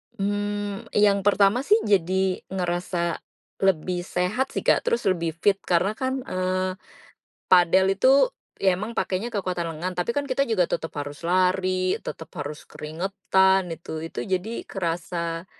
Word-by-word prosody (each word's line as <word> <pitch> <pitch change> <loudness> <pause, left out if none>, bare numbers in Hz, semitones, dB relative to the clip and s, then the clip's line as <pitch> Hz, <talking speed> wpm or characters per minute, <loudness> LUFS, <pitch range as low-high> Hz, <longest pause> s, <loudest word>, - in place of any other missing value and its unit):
Mmm, 205 0 -2
yang 205 -1 +4
pertama 200 +3 +4
sih 425 - +6
jadi 190 -1 +1
ngerasa 175 -2 -2 0.4
lebih 180 -1 +1
sehat 200 +11 -1
sih - - -1
Kak, - - +3
terus 475 -1 +1
lebih 170 -3 -1
fit, 195 +3 +2
karena 180 +3 +2
kan, 260 0 -1
eee, 185 -2 -1 0.7
padel 185 +2 +5
itu 255 +7 +4 0.5
ya 190 -1 +4
emang 215 +4 -5
pakainya 195 +2 -1
kekuatan 185 -4 -2
lengan 180 +4 -3
tapi 180 +7 0
kan 285 -1 -2
kita 275 +2 +1
juga 215 -7 +2
tetep 160 0 -2
harus 145 +2 -6
lari, 185 +1 +2
tetep 160 - -7
harus 145 0 -6
keringetan 190 +3 +1
itu. 160 -1 -7
Itu 165 - -6
jadi 190 +4 -2
kerasa 170 -1 -3
185 Hz, 140 wpm, -25 LUFS, 175-200 Hz, 0.7 s, sih